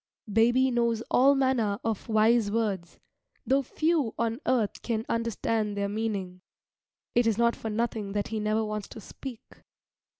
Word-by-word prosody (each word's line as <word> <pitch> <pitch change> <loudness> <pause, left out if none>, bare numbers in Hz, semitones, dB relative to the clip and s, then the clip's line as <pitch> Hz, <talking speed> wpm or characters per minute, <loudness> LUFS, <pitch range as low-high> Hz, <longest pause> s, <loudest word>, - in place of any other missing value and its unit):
Baby 240 +4 +4
knows 235 -2 +1
all 275 +3 +5
manner 255 -7 +1
of 225 0 -3
wise 220 0 +4
words, 200 -6 -2 0.5
though 270 +1 +3
few 305 -2 0
on 230 +1 -1
earth 230 -5 +1
can 225 -1 -2
understand 225 -2 -1
their 200 0 -1
meaning. 200 -4 -3 0.7
It 240 -1 +3
is 220 -2 +2
not 235 0 +3
for 220 - -5
nothing 215 -2 -2
that 205 -1 -2
he 220 0 -2
never 215 +1 0
wants 210 -1 -4
to - - -10
speak. 240 +2 -9
225 Hz, 155 wpm, -28 LUFS, 210-240 Hz, 0.7 s, all